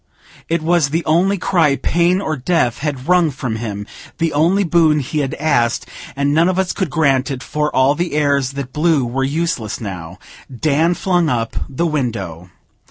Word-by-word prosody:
It 165 -1 0
was 165 -3 +2
the 165 +4 -1
only 180 +6 +2
cry 165 -6 +2
pain 175 +5 +1
or 155 -5 -2
death 130 -4 0
had 140 -2 -4
wrung 180 -2 +4
from 125 -5 -4
him, 105 -3 -5 0.3
the 165 -1 0
only 170 +7 +3
boon 165 -3 +3
he 145 +3 -3
had 135 -3 -2
asked; 120 -6 0 0.3
and 140 +1 +1
none 165 +4 +4
of 185 - -1
us 190 -1 0
could 190 -5 -2
grant 135 -2 +1
it, 130 -2 -5
for 150 0 -1
all 130 +2 +4
the 170 +2 -3
airs 140 -3 +1
that 140 -2 -6
blew 155 -4 +2
were 130 +3 -2
useless 140 -6 -2
now. 90 -4 -7 0.4
Dan 160 +3 +2
flung 175 -4 +1
up 115 -3 -2
the 140 +5 -1
window. 110 - -3
150 Hz, 180 wpm, -18 LUFS, 130-170 Hz, 0.4 s, wrung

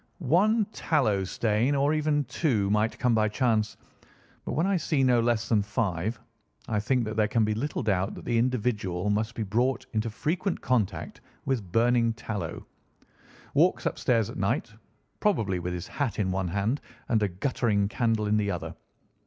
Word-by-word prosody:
"One 215 +4 +4
tallow 110 -12 +1
stain, 115 +7 +1
or 140 +2 +2
even 150 -1 +1
two, 120 - 0
might 105 +2 +1
come 125 -2 +2
by 110 -1 +3
chance; 110 -2 0 0.7
but - - -3
when 160 - +1
I 195 0 +2
see 155 -5 +1
no 125 -2 +4
less 115 -1 +1
than 110 -3 +3
five, 105 0 -2 0.5
I 105 -2 0
think 125 +4 +1
that 110 0 -4
there 110 -1 +3
can 115 0 +2
be 105 - 0
little 135 +6 -2
doubt 95 -2 0
that - - -10
the 120 -1 +1
individual 105 -6 0
must 110 +3 -1
be 110 - -2
brought 120 +5 0
into 110 +1 0
frequent 170 - -2
contact 120 -6 -1 0.2
with 115 -10 -2
burning 115 +1 +3
tallow—walks 105 -7 -4
upstairs 115 -3 +1
at - - -8
night 100 +3 -1 0.5
probably 110 - +1
with 90 +1 -3
his 90 - -5
hat 140 -7 -3
in 95 -3 0
one 95 0 -1
hand 100 - -1 0.3
and 110 -2 +2
a 105 - +3
guttering 100 +1 0
candle 115 -1 0
in 105 +1 +2
the 105 -1 0
other. 85 -3 -4
110 Hz, 170 wpm, -27 LUFS, 105-125 Hz, 0.7 s, One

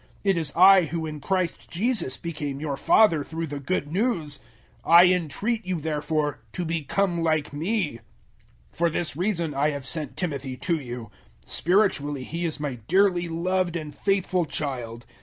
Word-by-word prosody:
It 195 -2 +3
is 160 -4 -1
I 185 0 +7
who 160 +1 -3
in 155 -1 -6
Christ 185 +1 -2
Jesus 200 - +1
became 150 -4 -5
your 145 -2 -2
father 165 -2 +4
through 165 +2 -4
the 145 -2 -5
Good 145 +1 -2
News. 170 - -1 0.4
004:016 - - -4
I 175 +1 +10
entreat 195 - -1
you 185 -2 -2
therefore 150 -1 -1
to 180 - -3
become 170 +3 0
like 155 -3 0
me. 165 - -1 0.7
004:017 - - -26
For 170 0 +3
this 165 -2 -2
reason 170 -3 -1
I 140 +2 +2
have 140 -3 -5
sent 150 -1 -3
Timothy 140 -7 -3
to 170 +1 -1
you. 120 -5 -7 0.3
Spiritually 160 -7 +1
he 170 +5 -4
is 160 -2 -2
my 140 -5 -4
dearly 185 -1 +3
loved 175 +1 -1
and 155 -3 -5
faithful 190 -2 +1
child. 125 -6 -4
165 Hz, 165 wpm, -25 LUFS, 145-180 Hz, 0.7 s, I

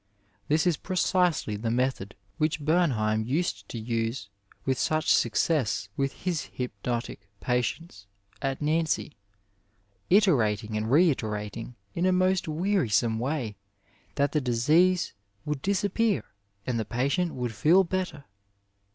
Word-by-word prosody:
This 155 +3 +2
is 175 -4 +2
precisely 180 - +1
the 110 +2 -2
method 120 -4 -1 0.2
which 155 -1 0
Bemheim 120 -11 +2
used 120 - -2
to - - -5
use 115 -1 -2 0.4
with 130 -1 0
such 155 0 +2
success 115 - +1
with 135 -1 -3
his 175 -6 -2
hypnodtic 120 -3 -4
patients 125 -2 -2 0.3
at 135 +1 -2
Nancy, 155 0 0 0.9
iterating 115 - +3
and 110 +1 -1
reiterating, 115 - +1 0.2
in 175 +2 +1
a - - +4
most 185 0 +2
wearisome 155 - +1
way, 125 -5 -2 0.6
that 140 0 +1
the 150 - +1
disease 155 +9 +3 0.3
would 150 -2 -2
disappear 200 +2 +1 0.4
and 120 -2 -1
the - - 0
patient 140 +8 0
would 125 -3 -3
feel 170 - +5
better. 180 -5 -3
135 Hz, 120 wpm, -27 LUFS, 115-170 Hz, 0.9 s, feel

